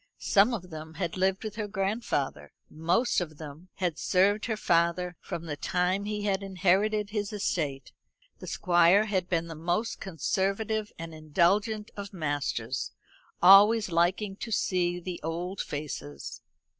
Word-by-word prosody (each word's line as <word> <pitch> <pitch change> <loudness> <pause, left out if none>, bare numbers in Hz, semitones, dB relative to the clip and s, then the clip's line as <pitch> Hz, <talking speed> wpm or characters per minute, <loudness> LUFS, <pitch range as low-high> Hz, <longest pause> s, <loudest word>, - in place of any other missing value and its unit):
Some 205 +5 +4
of 185 -6 -5
them 160 0 -8
had 175 -4 -3
lived 190 +1 +1
with 215 0 -6
her 210 -2 -2
grandfather; 195 - -2 0.2
most 175 +9 +1
of 155 -3 -6
them 155 +4 -10
had 175 -4 -2
served 200 +3 +2
her 220 -2 -1
father 175 -1 +1
from 170 - -6
the 150 -3 -4
time 180 +6 0
he 210 0 -3
had 200 -1 0
inherited 200 +2 +1
his 205 -2 -2
estate. 155 -9 -2 0.5
The - - -9
Squire 175 +2 +4
had 190 -4 -1
been 170 -2 +1
the 165 - -7
most 175 +8 -2
conservative 200 +5 -1
and 165 0 -7
indulgent 190 +8 +1
of 200 0 -7
masters; 145 -6 -2 0.5
always 205 +2 +7
liking 185 +4 +1
to 225 - -6
see 175 -3 +1
the 180 0 -6
old 175 +4 -3
faces. 75 - -6
185 Hz, 145 wpm, -28 LUFS, 165-205 Hz, 0.5 s, always